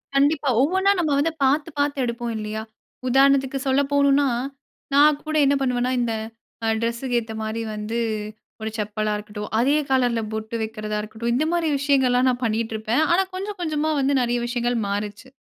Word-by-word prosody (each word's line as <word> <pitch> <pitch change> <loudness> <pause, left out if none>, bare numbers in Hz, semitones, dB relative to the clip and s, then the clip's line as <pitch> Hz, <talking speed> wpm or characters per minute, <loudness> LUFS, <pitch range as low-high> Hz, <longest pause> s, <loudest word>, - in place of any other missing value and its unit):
கண்டிப்பா, 285 0 +3
ஒவ்வொன்னா 380 +7 +3
நம்ம 310 -3 +1
வந்து 325 +3 +1
பார்த்து, 290 +4 +2
பார்த்து 285 -2 +1
எடுப்போம் 235 0 -3
இல்லையா? 215 0 -4 0.5
உதாரணத்துக்கு 270 +1 +3
சொல்ல 265 +2 +3
போனுனா, 280 0 +4 0.7
நான் 295 +1 +5
கூட 310 0 -3
என்ன 280 +1 +3
பண்ணுவன்னா, 250 -1 0
இந்த 230 -2 0 0.5
அ - - +1
டிரஸ்ஸுக்கு 235 +2 -1
ஏத்த 225 -1 -7
மாதிரி 220 +1 -3
வந்து 215 +2 -3 0.6
ஒரு 220 - -2
செப்பலா 210 0 -1
இருக்கட்டும். 210 0 -7
அதே 280 +5 +3
கலர்ல 245 -3 +2
பொட்டு 220 +1 -4
வைக்கிறதா 215 -1 -3
இருக்கட்டும். 220 +2 -4
இந்த 305 +4 +1
மாதிரி 335 -2 +1
விஷயங்கள்லாம் 260 -3 +3
நான் 245 0 -2
பண்ணிட்டுருப்பேன். 225 +3 0
ஆனா 380 +2 +4
கொஞ்சம், 400 +2 -5
கொஞ்சமா 310 -1 0
வந்து 275 +1 +2
நெறைய 240 0 0
விஷயங்கள் 240 0 -1
மாறுச்சு. 210 +5 -4
250 Hz, 160 wpm, -23 LUFS, 225-285 Hz, 0.7 s, நான்